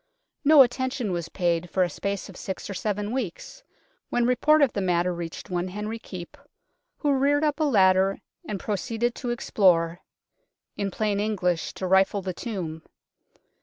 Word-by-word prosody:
No 295 -1 +8
attention 255 -2 -2
was 170 -2 -3
paid 175 -1 0
for 185 - +2
a - - +1
space 200 +4 -3
of 195 - -12
six 190 - -6
or - - -3
seven 205 +1 -2
weeks, 250 - -5 0.5
when 240 -1 +1
report 295 +5 +4
of 265 - +2
the 200 - -1
matter 180 -1 +1
reached 170 +2 -7
one 175 0 -1
Henry 210 +4 -5
Keepe, 180 -5 -9 0.6
who 290 -2 +1
reared 285 +2 +2
up 300 0 +1
a 310 - +2
ladder 195 -6 +4 0.3
and 205 -2 -4
proceeded 230 +4 -1
to 245 - -5
explore 175 -7 +2 0.8
in 200 -1 -2
plain 205 +1 -1
English, 185 -5 -1
to 190 - -4
rifle 190 +1 +3
the 185 -1 -3
tomb. 175 -7 -5
200 Hz, 165 wpm, -26 LUFS, 180-240 Hz, 0.8 s, No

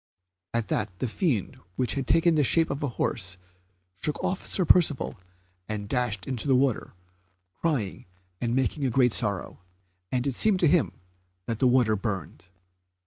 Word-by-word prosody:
At 115 -2 -1
that 90 - -2
the 130 - -2
fiend 120 - -1 0.2
which 125 +3 0
had 135 -2 -3
taken 165 0 +4
the 150 -2 +3
shape 165 +5 +3
of 140 - -4
a 145 - 0
horse 95 -3 -1 0.6
shook 150 - -2
off 185 - -1
Sir 185 - 0
Percivale 155 -5 +4 0.5
and 105 -1 -4
dashed 120 -5 -1
into 130 0 -2
the 135 - +4
water, 130 -6 0 0.6
crying 130 - -2 0.3
and 120 0 0
making 135 +1 0
great 125 -1 +3
sorrow; 105 -5 -2 0.5
and 125 0 0
it 140 - 0
seemed 205 - +3
to 170 - +5
him 170 0 +3 0.5
that 115 -2 -3
the 130 - +4
water 120 -4 +3
burned. 95 -5 -4
125 Hz, 160 wpm, -27 LUFS, 110-150 Hz, 0.6 s, to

